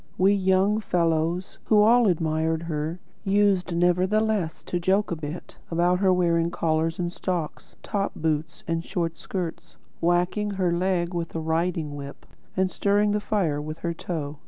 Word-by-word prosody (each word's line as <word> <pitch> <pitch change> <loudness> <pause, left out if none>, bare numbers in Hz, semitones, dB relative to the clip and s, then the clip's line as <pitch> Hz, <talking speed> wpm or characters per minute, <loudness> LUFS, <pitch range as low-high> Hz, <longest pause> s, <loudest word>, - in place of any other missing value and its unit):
We 195 +2 +4
young 195 +2 +2
fellows, 170 -2 0
who 210 -1 +5
all 235 +1 +5
admired 160 -2 0
her, 160 +1 -3 0.2
used 195 -3 +2
nevertheless 185 +1 +1
to 175 - -2
joke 190 +4 +1
a - - 0
bit 155 +2 -7
about 175 +2 +2
her 190 -1 +4
wearing 170 -2 +2
collars 165 -1 0
and 175 -1 -2
stocks, 175 -6 -4
top 200 -1 -2
boots 155 0 -2
and 165 0 -1
short 170 -4 -3
skirts; 175 -4 -5 0.2
whacking 175 +5 +1
her 180 -2 +2
leg 175 0 0
with 170 -1 -4
a - - 0
riding 160 -1 -1
whip, 140 0 -9 0.3
and 185 0 +2
stirring 205 +1 +2
the 210 - +1
fire 175 -9 0
with 155 +1 -6
her 170 - 0
toe. 155 -4 -5
175 Hz, 160 wpm, -25 LUFS, 165-190 Hz, 0.3 s, who